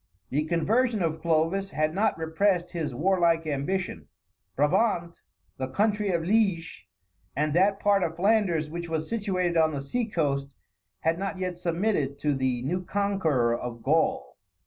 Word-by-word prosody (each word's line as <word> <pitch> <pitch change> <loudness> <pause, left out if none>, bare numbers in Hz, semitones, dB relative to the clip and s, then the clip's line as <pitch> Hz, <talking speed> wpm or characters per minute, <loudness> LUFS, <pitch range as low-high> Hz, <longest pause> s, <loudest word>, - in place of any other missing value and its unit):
The 150 +3 0
conversion 215 +7 +1
of 160 -1 -2
Clovis 170 +4 +1
had 155 -3 0
not 200 +1 +1
repressed 175 +2 0
his 155 -7 -3
warlike 170 0 +2
ambition. 155 +6 -2 0.5
Brabant, 170 - +1 0.4
the 130 - -2
country 210 +6 0
of 170 -3 0
Liege, 185 - 0 0.5
and 150 +2 0
that 195 +3 +3
part 200 -1 +3
of 165 -2 -1
Flanders 185 -4 +2
which 170 +2 -6
was 160 -1 -2
situated 185 -6 -1
on 160 -1 +3
the - - -2
sea 235 - -2
coast, 140 - -1 0.5
had 165 +2 +1
not 195 0 -3
yet 185 -1 -3
submitted 170 -5 0
to 145 0 0
the 130 -2 -1
new 180 +7 -2
conqueror 170 -13 +1
of 120 -1 -6
Gaul. 130 - 0
170 Hz, 150 wpm, -27 LUFS, 150-195 Hz, 0.5 s, that